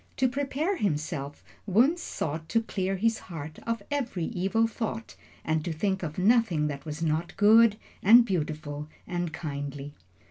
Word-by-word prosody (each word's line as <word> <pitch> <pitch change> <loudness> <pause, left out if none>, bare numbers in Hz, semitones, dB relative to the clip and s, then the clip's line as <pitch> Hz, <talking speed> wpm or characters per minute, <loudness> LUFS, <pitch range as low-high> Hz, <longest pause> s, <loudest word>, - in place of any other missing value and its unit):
To 260 - +3
prepare 285 +8 -1
himself, 150 - -2 0.2
Wunzh 250 - +4
sought 160 - -4
to 230 0 +2
clear 195 -3 -2
his 225 +3 +1
heart 155 -2 -7
of 230 0 -1
every 250 -11 -2
evil 195 +7 +1
thought 225 0 -4 0.3
and 160 -1 0
to 170 - -3
think 190 +4 -1
of 155 -4 -5
nothing 195 -6 +3
that 140 -2 -6
was 155 +1 -4
not 165 +2 -1
good, 215 +1 +6 0.2
and 230 +4 +8
beautiful, 150 -5 -3 0.2
and 175 -2 -3
kindly. 145 -2 -5
185 Hz, 150 wpm, -28 LUFS, 155-225 Hz, 0.3 s, and